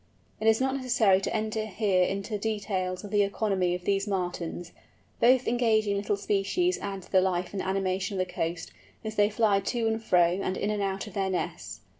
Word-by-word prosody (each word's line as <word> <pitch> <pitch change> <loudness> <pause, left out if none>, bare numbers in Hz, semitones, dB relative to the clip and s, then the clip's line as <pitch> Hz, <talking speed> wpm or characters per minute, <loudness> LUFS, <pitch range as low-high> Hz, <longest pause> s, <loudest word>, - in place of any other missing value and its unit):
It 220 - -1
is 220 0 +5
not 265 +1 +1
necessary 240 -7 +3
to - - -2
enter 220 0 -2
here 200 -3 +2
into 200 +3 -2
details 200 -4 -2
of 205 - -8
the 205 -1 +3
economy 195 -3 0
of 180 - -8
these 200 +1 +1
Martins. 175 -3 -3 0.5
Both 255 +1 +4
engaging 220 -4 +2
little 200 0 -1
species 210 - 0
add 195 -2 -5
to - - -18
the 190 - +5
life 185 -1 -1
and 195 - -2
animation 190 0 -1
of 185 - 0
the 180 - -13
coast, 165 +1 -3 0.3
as 220 - -3
they 205 -1 +4
fly 210 -2 +2
to 230 +4 -2
and 220 0 -1
fro 180 -3 +3
and 185 - -2
in 205 - -1
and 210 -1 -1
out 195 0 -2
of 210 - -10
their 195 -1 -1
nests. 185 - -4
200 Hz, 205 wpm, -28 LUFS, 185-220 Hz, 0.5 s, is